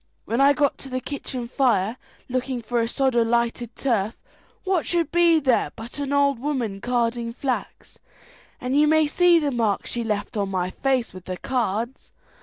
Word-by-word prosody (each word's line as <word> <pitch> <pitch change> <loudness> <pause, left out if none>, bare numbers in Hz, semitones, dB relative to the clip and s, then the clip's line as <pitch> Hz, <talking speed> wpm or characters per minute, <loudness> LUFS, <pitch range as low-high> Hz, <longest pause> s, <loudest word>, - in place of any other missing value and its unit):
When 235 +4 0
I 280 +1 +6
got 285 -1 +1
to 270 - -8
the 255 0 -2
kitchen 255 -3 -5
fire, 235 -5 +1 0.3
looking 255 0 -2
for 235 +1 -1
a 230 - 0
sod 265 +2 +1
of 235 -1 +3
lighted 235 0 0
turf, 225 -5 0 0.5
what 375 -4 +1
should 335 -3 0
be 340 -1 +5
there 260 -5 +2
but 230 +5 -8
an 285 -1 -3
old 280 -3 +3
woman 240 -8 -2
carding 235 -1 0
flax, 255 +1 -4 0.6
and 255 +1 -2
you 300 +1 +5
may 315 0 +4
see 350 +3 +4
the 295 -3 +1
marks 225 -5 0
she 240 - -2
left 210 +1 -3
on 200 -1 0
my 185 -1 -1
face 260 -1 0
with 185 -1 -11
the 185 -1 -4
cards. 235 0 -2
250 Hz, 185 wpm, -24 LUFS, 230-280 Hz, 0.6 s, I